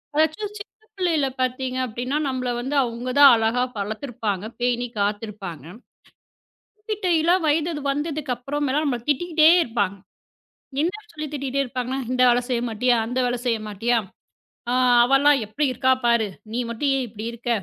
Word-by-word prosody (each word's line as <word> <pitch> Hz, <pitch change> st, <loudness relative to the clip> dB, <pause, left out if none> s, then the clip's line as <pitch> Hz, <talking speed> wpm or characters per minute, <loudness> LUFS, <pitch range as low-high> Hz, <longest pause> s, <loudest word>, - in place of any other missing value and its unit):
எதாச்சும் 315 Hz, +7 st, 0 dB
சின்னப் 435 Hz, +2 st, -14 dB
புள்ளையில 335 Hz, -7 st, +1 dB
பாத்தீங்க 255 Hz, 0 st, -1 dB
அப்படின்னா, 250 Hz, +5 st, -3 dB
நம்மள 255 Hz, -1 st, -2 dB
வந்து 265 Hz, +4 st, -3 dB
அவுங்கதான் 255 Hz, +4 st, +5 dB
அழகா 225 Hz, +2 st, +1 dB
வளர்த்துப்பாங்க. 215 Hz, -1 st, -3 dB, 0.2 s
பேணிக்காத்துருப்பாங்க. 210 Hz, -, -2 dB, 1.3 s
திட்டற 350 Hz, -5 st, +2 dB
வயது 310 Hz, +1 st, +1 dB
வந்ததுக்கு 295 Hz, -1 st, -2 dB
அப்புறம் 285 Hz, +4 st, -3 dB
எல்லாம் 300 Hz, +4 st, +1 dB
நம்மள 255 Hz, -5 st, -1 dB
திட்டிட்டே 315 Hz, +2 st, +4 dB
இருப்பாங்க. 205 Hz, -4 st, -1 dB, 0.9 s
என்ன 340 Hz, +4 st, 0 dB, 0.2 s
சொல்லித் 305 Hz, -2 st, -6 dB
திட்டிட்டே 275 Hz, -1 st, -1 dB
இருப்பாங்கன்னா, 255 Hz, +1 st, -3 dB
இந்த 255 Hz, 0 st, +1 dB
வேலை 245 Hz, 0 st, +3 dB
செய்ய 240 Hz, -2 st, 0 dB
மாட்டியா? 240 Hz, +3 st, +2 dB
அந்த 250 Hz, +2 st, -2 dB
வேலை 245 Hz, 0 st, 0 dB
செய்ய 230 Hz, -2 st, +1 dB
மாட்டியா? 230 Hz, +4 st, 0 dB, 0.7 s
ஆ, -, -, +1 dB, 0.3 s
அவள்லாம் 275 Hz, +3 st, +4 dB
எப்படி 285 Hz, +8 st, -1 dB
இருக்கா 260 Hz, +1 st, +2 dB
பாரு! 235 Hz, -2 st, +3 dB, 0.3 s
நீ 240 Hz, -, -1 dB
மட்டும் 255 Hz, +5 st, -1 dB
ஏன் 260 Hz, -, -1 dB
இப்படி 210 Hz, +1 st, -8 dB
இருக்க? 240 Hz, +1 st, -6 dB
255 Hz, 140 wpm, -23 LUFS, 235-295 Hz, 1.3 s, அவுங்கதான்